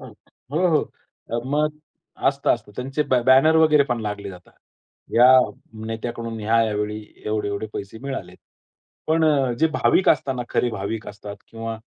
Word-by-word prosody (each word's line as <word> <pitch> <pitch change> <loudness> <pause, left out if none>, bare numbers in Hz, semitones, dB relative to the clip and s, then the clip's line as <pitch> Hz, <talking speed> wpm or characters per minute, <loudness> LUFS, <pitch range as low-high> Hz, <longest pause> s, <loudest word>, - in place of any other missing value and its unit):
हो, - - -11 0.4
हो. 165 -1 +1 0.6
मग 150 +1 +2 0.6
असतं, 140 0 0
असतं. 105 -3 -13
त्यांचे 135 +4 -2
ब 130 - 0
बॅनर 135 +5 +6
वगैरे 155 -2 +5
पण 120 -3 -2
लागले 105 -2 -5
जातात. 90 -1 -14 0.6
या 120 +2 +7 0.6
नेत्याकडून 115 0 -5
या-या 110 0 +2
वेळी 105 +1 -2 0.3
एवढे-एवढे 105 0 -2
पैसे 100 +3 -7
मिळाले. 130 -10 -5 0.7
पण 160 0 +2 0.4
जे 160 - +5
भाविक 190 - +2
असताना 130 -4 +1
खरे 120 - 0
भाविक 105 +2 -4
असतात 100 0 -9
किंवा 115 0 -5
115 Hz, 135 wpm, -22 LUFS, 105-140 Hz, 0.7 s, या